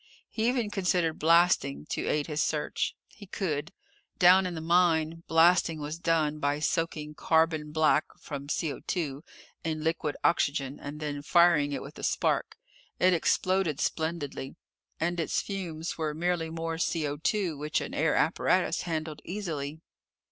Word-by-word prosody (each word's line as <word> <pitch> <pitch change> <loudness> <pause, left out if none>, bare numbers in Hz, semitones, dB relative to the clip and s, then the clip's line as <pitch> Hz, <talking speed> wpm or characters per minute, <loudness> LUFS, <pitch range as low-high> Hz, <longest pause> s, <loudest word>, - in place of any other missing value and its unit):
He 220 0 0
even 240 -4 0
considered 180 -5 0
blasting, 165 -4 +3
to - - -2
aid 150 -1 +1
his 150 -1 -2
search. 150 -1 -1
He 205 -2 -14
could. 165 -5 -3 0.5
Down 185 +1 +6
in 175 - -5
the - - -4
mine, 165 -1 +2
blasting 165 0 +4
was 150 +2 -5
done 155 -3 +1
by 145 0 0
soaking 155 -1 -1
carbon 160 -1 +1
black 155 -1 +3
from 140 -2 -7
CO 150 0 -2 0.8
in 155 -1 -2
liquid 160 -2 -1
oxygen, 140 -4 +1
and 145 +1 -7
then 145 -2 -4
firing 165 -2 +4
it 140 - -3
with 140 +3 -11
a - - -9
spark. - - 0 0.4
It 185 0 +4
exploded 180 -2 +1
splendidly. 160 -5 -3 0.4
And 175 +2 -1
its 165 - 0
fumes 170 -5 -5
were 155 -2 -1
merely 170 0 -1
more 165 0 -4
CO 165 +3 -1
which 150 +2 -1
an - - -6
air 155 0 +1
apparatus 170 +2 +2
handled 155 -3 -4
easily. 160 -6 -5
160 Hz, 145 wpm, -28 LUFS, 150-175 Hz, 0.8 s, Down